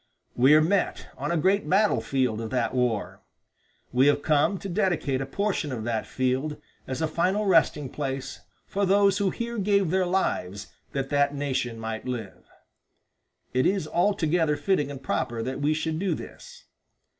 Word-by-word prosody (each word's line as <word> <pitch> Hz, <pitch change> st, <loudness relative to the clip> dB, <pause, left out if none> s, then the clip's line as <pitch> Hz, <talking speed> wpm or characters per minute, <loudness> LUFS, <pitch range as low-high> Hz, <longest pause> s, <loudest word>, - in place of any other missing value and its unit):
We 130 Hz, +5 st, +6 dB
are 155 Hz, -, +6 dB
met 190 Hz, +4 st, 0 dB
on -, -, -4 dB
a 170 Hz, -, +1 dB
great 190 Hz, +5 st, +1 dB
battle 205 Hz, +3 st, +3 dB
field 125 Hz, -5 st, 0 dB
of 110 Hz, -, -4 dB
that 125 Hz, -1 st, -1 dB
war. 125 Hz, -4 st, -1 dB, 0.7 s
We 130 Hz, +3 st, +4 dB
have 145 Hz, 0 st, +2 dB
come 155 Hz, +6 st, +2 dB
to 195 Hz, -, -7 dB
dedicate 175 Hz, -8 st, 0 dB
a 135 Hz, -, -4 dB
portion 195 Hz, -2 st, -1 dB
of 115 Hz, -4 st, -4 dB
that 115 Hz, -1 st, -2 dB
field 130 Hz, +4 st, -1 dB, 0.3 s
as 130 Hz, +4 st, -3 dB
a -, -, +2 dB
final 185 Hz, +6 st, 0 dB
resting 165 Hz, -6 st, +3 dB
place 135 Hz, -1 st, -4 dB, 0.3 s
for 200 Hz, -, -2 dB
those 200 Hz, +1 st, +4 dB
who 200 Hz, -1 st, +2 dB
here 235 Hz, +2 st, -4 dB
gave 200 Hz, -3 st, +2 dB
their 185 Hz, -1 st, +2 dB
lives 100 Hz, -, -2 dB, 0.2 s
that 135 Hz, -1 st, -2 dB
that 145 Hz, 0 st, +2 dB
nation 130 Hz, -5 st, -2 dB
might 110 Hz, +1 st, -5 dB
live. 115 Hz, -6 st, -6 dB, 1.1 s
It 130 Hz, 0 st, +3 dB
is 190 Hz, -5 st, 0 dB
altogether 170 Hz, -4 st, +1 dB
fitting 145 Hz, -2 st, 0 dB
and 135 Hz, -2 st, -8 dB
proper 115 Hz, -3 st, -2 dB
that 130 Hz, +3 st, -4 dB
we 145 Hz, +1 st, +2 dB
should 160 Hz, 0 st, -2 dB
do 195 Hz, 0 st, 0 dB
this. 485 Hz, 0 st, -11 dB
150 Hz, 170 wpm, -26 LUFS, 130-190 Hz, 1.1 s, We